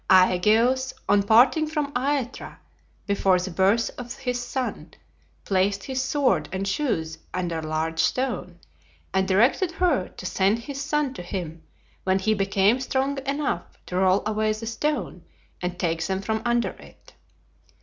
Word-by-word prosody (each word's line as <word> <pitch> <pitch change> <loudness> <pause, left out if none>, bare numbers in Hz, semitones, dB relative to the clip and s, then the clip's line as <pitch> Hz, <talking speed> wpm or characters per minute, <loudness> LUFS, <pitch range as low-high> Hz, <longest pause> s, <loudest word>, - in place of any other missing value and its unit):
Aegeus 220 +8 +4
on 205 0 +4
parting 245 +9 +5
from 300 -2 -2
Aethra, 265 0 -2 0.5
before 195 -2 +3
the 185 +1 -4
birth 195 +6 +2
of 245 -1 -7
his 250 -1 -3
son, 250 +1 -4 0.5
placed 195 +1 +1
his 260 -1 -2
sword 270 0 +1
and 190 +1 -2
shoes 165 - -1 0.2
under 175 -3 -2
a 155 - -6
large 160 +1 -2
stone 180 -2 -1 0.6
and 190 0 +2
directed 245 - +3
her 320 - +1
to - - -11
send 195 +3 +2
his 275 +4 -6
son 295 -2 0
to 255 - -7
him 175 -3 -5 0.4
when 190 0 +2
he 215 +3 +1
became 200 +3 +2
strong 270 +1 -1
enough 280 -10 -2
to 180 - -6
roll 190 +1 +3
away 215 0 +1
the 215 +1 -7
stone 295 +7 -2 0.4
and 180 0 -3
take 165 -2 -1
them 190 -1 -1
from 220 +2 -2
under 240 0 +1
it. - - -16
215 Hz, 150 wpm, -25 LUFS, 185-260 Hz, 0.6 s, parting